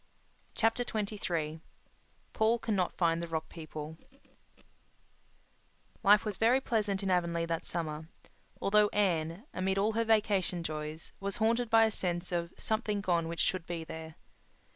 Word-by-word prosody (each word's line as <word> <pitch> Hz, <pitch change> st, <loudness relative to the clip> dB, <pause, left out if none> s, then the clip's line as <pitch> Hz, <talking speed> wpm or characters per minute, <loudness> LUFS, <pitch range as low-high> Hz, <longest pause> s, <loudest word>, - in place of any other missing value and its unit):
Chapter 225 Hz, +2 st, +2 dB
XXIII 200 Hz, -9 st, -2 dB, 0.7 s
Paul 225 Hz, +1 st, +3 dB
Cannot 205 Hz, -6 st, -1 dB
Find 165 Hz, -1 st, +2 dB
the 170 Hz, -, -4 dB
Rock 160 Hz, -1 st, -3 dB
People 155 Hz, -1 st, -8 dB, 2.0 s
Life 210 Hz, 0 st, +6 dB
was 210 Hz, -4 st, -3 dB
very 235 Hz, +5 st, +4 dB
pleasant 210 Hz, -6 st, 0 dB
in 190 Hz, -, 0 dB
Avonlea 170 Hz, -2 st, +1 dB
that 165 Hz, -1 st, -3 dB
summer, 160 Hz, -2 st, -3 dB, 0.5 s
although 210 Hz, +1 st, +4 dB
Anne, 175 Hz, -3 st, 0 dB
amid 190 Hz, +1 st, 0 dB
all 205 Hz, +3 st, +3 dB
her 230 Hz, +1 st, +2 dB
vacation 205 Hz, -6 st, +2 dB
joys, 155 Hz, 0 st, -5 dB
was 200 Hz, 0 st, -2 dB
haunted 230 Hz, +2 st, +1 dB
by 225 Hz, -1 st, +6 dB
a 220 Hz, -, +1 dB
sense 175 Hz, -2 st, -2 dB
of 170 Hz, -1 st, -1 dB
"something 215 Hz, -2 st, -1 dB
gone 170 Hz, -3 st, +1 dB
which 170 Hz, 0 st, -3 dB
should 185 Hz, -3 st, 0 dB
be 170 Hz, -2 st, -3 dB
there." 160 Hz, 0 st, -8 dB
185 Hz, 140 wpm, -32 LUFS, 165-215 Hz, 2.0 s, Life